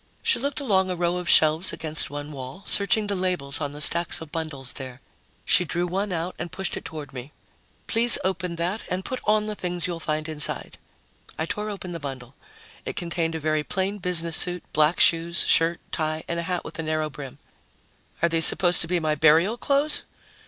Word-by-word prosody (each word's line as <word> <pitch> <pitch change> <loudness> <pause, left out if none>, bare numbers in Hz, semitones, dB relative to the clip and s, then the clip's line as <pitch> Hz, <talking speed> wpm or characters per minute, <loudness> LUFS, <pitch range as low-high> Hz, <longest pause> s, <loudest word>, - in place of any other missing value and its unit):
She - - +3
looked 280 +3 -2
along 190 -9 +1
a 180 - -2
row 175 0 -1
of 180 -1 -4
shelves 160 +2 +5
against 155 -1 -3
one 145 +1 -7
wall, 135 +6 -9
searching 210 +1 +3
the 205 -1 -1
labels 180 -7 -1
on 145 -1 -3
the 145 +1 -7
stacks 170 +3 +4
of 160 -2 -10
bundles 155 -5 -3
there. 130 -2 -7 0.5
She 180 - +5
drew 175 +1 -2
one 195 +3 -2
out 175 +1 -3
and 175 - -5
pushed 190 -1 -3
it - - -7
toward 150 -3 -8
me. 130 +2 -8 0.5
"Please 235 +1 +7
open 180 -2 -2
that 175 +6 -2
and 185 +1 -3
put 255 - -4
on 215 0 +2
the 215 - -3
things 180 -4 -4
you'll 175 -2 -3
find 155 -1 -3
inside." 150 -2 -1 0.6
I 160 - -2
tore 210 +5 -4
open 195 -3 -7
the 170 - -5
bundle. 135 -3 -8 0.5
It - - -5
contained 170 -1 -2
a - - -3
very 155 0 0
plain 195 +5 -3
business 170 -2 +2
suit, 180 -1 0
black 155 +2 +2
shoes, 170 +1 +4
shirt, 165 +1 +3
tie 155 0 -2
and 170 - -2
a 170 +2 -4
hat 180 -1 -2
with - - -9
a - - 0
narrow 155 -1 -2
brim. 135 -2 -9 0.9
"Are 170 - +4
these 165 -1 +1
supposed 175 -1 +3
to 165 - -1
be 175 +1 0
my 155 -2 0
burial 160 +8 +4
clothes?" 285 +4 +1
170 Hz, 205 wpm, -24 LUFS, 155-185 Hz, 0.9 s, Please